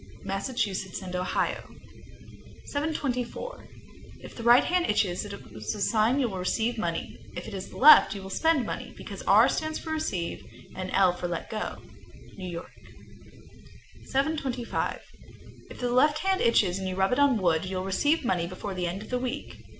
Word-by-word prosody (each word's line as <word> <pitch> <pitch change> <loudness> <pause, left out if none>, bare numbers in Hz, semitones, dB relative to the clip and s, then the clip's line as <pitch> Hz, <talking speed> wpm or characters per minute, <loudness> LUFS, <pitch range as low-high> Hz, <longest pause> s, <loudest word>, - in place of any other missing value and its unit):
Massachusetts 195 -2 -2
and 180 -1 -6
Ohio. 180 0 -1 1.0
724. 290 - -3 0.5
If - - -11
the - - -7
right 240 +2 +6
hand 360 0 +1
itches, 200 -3 +1
it 205 - -7 0.2
is 110 -1 -4
a - - -7
sign 225 +5 +2
you 260 - +2
will 190 -4 -5
receive 225 +6 0
money; 170 -4 -3 0.2
if - - -5
the 190 -1 -7
left, 270 -8 +8
you 195 - -7
will 190 - -8
spend 320 -2 +2
money, - - -6
because - - -8
R - - +7
stands 315 0 -1
for 320 - -6
receive, 210 - -2 0.3
and 185 0 -4
L 190 -2 +4
for 180 0 -4
let 170 -1 -5
go. 215 -1 -4 0.5
New 185 -2 -6
York. 170 -1 -7 1.3
725. 270 -4 -1 0.7
If - - -11
the 245 -1 -1
left 295 +5 +4
hand 385 0 +2
itches 195 -5 +3
and 190 -1 -3
you 185 - -3
rub 190 0 +2
it 250 - +1
on 280 -4 +4
wood, 170 -4 +1
you'll 185 0 -3
receive 290 - +1
money 175 -6 +1
before 185 +2 -6
the 180 -1 -2
end 190 +4 -4
of - - -13
the 250 - 0
week. 250 -1 -4
215 Hz, 175 wpm, -27 LUFS, 185-265 Hz, 1.3 s, left